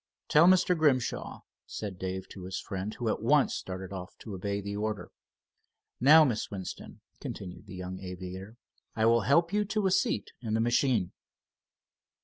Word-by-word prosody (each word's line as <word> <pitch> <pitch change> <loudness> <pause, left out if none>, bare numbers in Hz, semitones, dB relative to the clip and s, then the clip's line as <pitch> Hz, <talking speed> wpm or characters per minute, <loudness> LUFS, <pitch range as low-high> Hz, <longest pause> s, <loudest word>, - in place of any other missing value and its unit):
"Tell 160 +3 +6
Mr. 185 -1 +5
Grimshaw," 140 -7 0 0.3
said 100 -4 -6
Dave 95 0 -4
to 95 -2 -9
his 95 0 -4
friend, 95 +2 -4
who 120 - -3
at 110 - 0
once 140 +5 +3
started 95 0 -5
off 90 -1 -8
to 110 - -7
obey 100 +2 -2
the 100 0 -5
order. 105 0 -3 0.9
"Now, 150 +6 +8
Miss 120 -6 -1
Winston," 95 -3 -7 0.2
continued 95 +2 -7
the 95 - -9
young 90 0 -6
aviator, 95 +3 -8 0.4
"I 110 0 +2
will 115 0 +5
help 165 +6 +3
you 210 0 +3
to 210 0 -1
a 190 - +3
seat 185 - +1
in 110 -3 -2
the - - +1
machine." 120 -4 +2
105 Hz, 165 wpm, -29 LUFS, 95-135 Hz, 0.9 s, Now